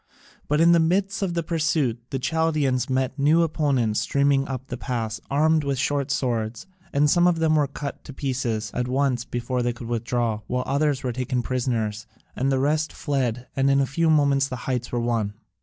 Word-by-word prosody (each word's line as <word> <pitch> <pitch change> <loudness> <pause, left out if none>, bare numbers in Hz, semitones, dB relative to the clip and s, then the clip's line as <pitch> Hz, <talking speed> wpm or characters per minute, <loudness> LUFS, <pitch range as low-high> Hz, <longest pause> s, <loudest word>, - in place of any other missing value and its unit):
But 150 +1 +1
in 170 +1 +6
the 170 - +5
midst 190 +4 +1
of 180 -3 -1
the 170 - 0
pursuit 155 -7 0
the 135 - -2
Chaldaeans 150 -3 0
met 130 +1 -1
new 155 +4 +4
opponents 140 -8 +1
streaming 140 -1 +2
up 130 -1 -5
the 130 - -5
pass, 115 -4 -3
armed 155 +2 +3
with 140 -1 -1
short 140 +1 0
swords, 115 -4 -1 0.3
and 145 +1 +3
some 175 +4 +4
of 175 -2 +2
them 160 -1 +2
were 150 -2 +3
cut 140 0 -6
to - - -8
pieces 125 -6 -2
at 125 0 -1
once 130 -2 0
before 125 +1 -2
they 120 0 0
could 115 0 -9
withdraw, 115 -1 -1
while 125 0 -1
others 140 0 0
were 125 -2 -1
taken 125 0 -2
prisoners 115 -4 -2 0.3
and 135 +2 0
the 135 - +2
rest 150 +4 +1
fled, 125 -4 -2
and 135 0 +2
in 140 0 +4
a 135 - +3
few 160 +5 0
moments 140 -3 +3
the 130 - -5
heights 125 -2 -2
were 120 - 0
won. 115 -3 -1
135 Hz, 200 wpm, -24 LUFS, 120-150 Hz, 0.3 s, in